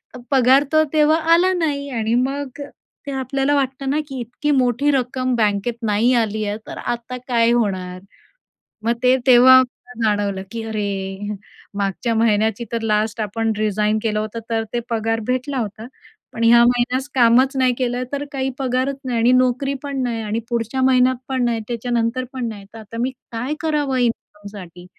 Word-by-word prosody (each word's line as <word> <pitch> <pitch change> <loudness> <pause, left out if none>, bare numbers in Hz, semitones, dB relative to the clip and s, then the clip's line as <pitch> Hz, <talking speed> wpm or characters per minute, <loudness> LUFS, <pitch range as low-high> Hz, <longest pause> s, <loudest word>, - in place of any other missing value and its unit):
तर - - -8
पगार 265 +1 +5
तर 310 - +5
तेव्हा 310 +1 +4 0.2
आला 360 +3 +4
नाही 290 -5 -1
आणि 225 -3 -1
मग 275 +2 -2 0.5
ते 280 - -3
आपल्याला 270 +2 0
वाटतं 270 0 -1
ना 295 +3 +1
की 270 -3 -6
इतकी 245 +5 -3
मोठी 260 +1 +2
रक्कम 255 -1 -1
बँकेत 210 +1 0
नाही 220 +4 +2
आली 215 -1 -2
आहे 205 0 -2
तर - - -7
आता 240 +1 -4
काय 235 -2 +3
होणार? 185 -6 -1 0.8
मग 230 +1 +2
ते 250 +1 +5
तेव्हा 260 +1 +8
मला 245 -1 -8 0.2
जाणवलं 200 -2 -2
की 230 -1 -5
अरे 205 -1 -4 0.4
मागच्या 200 +4 -1
महिन्याची 220 0 +1
तर 230 -1 -2
लास्ट 215 +1 0
आपण 225 +2 -1
रीझाइन 215 0 +1
केलं 215 -2 0
होतं 215 +2 -4
तर 225 -1 0
ते 240 - 0
पगार 225 -1 0
भेटला 255 +2 -1
होता. 220 0 -4 0.5
पण 230 - -3
ह्या 235 +1 +7
महिन्यास 245 +2 +1
कामच 255 +2 +4
नाही 255 -1 +3
केलं 250 -1 -1
तर 285 0 -2
काही 265 -1 -2
पगारच 260 +1 0
नाही 245 -2 -1
आणि 235 +2 +4
नोकरी 255 +2 +2
पण 280 -2 -3
नाही 235 -2 -2
आणि 215 +1 -2
पुढच्या 235 +2 -2
महिन्यात 255 0 +4
पण 260 -2 -1
नाही, 235 -1 0
त्याच्यानंतर 240 +1 -1
पण 255 -2 -3
नाही 205 -2 -9
तर - - -10
आता 220 +1 -10
मी 255 +2 0 0.2
काय 245 +5 -3
करावं 295 -4 0
इन्कमसाठी? 205 -7 -4
240 Hz, 175 wpm, -20 LUFS, 220-260 Hz, 0.8 s, तेव्हा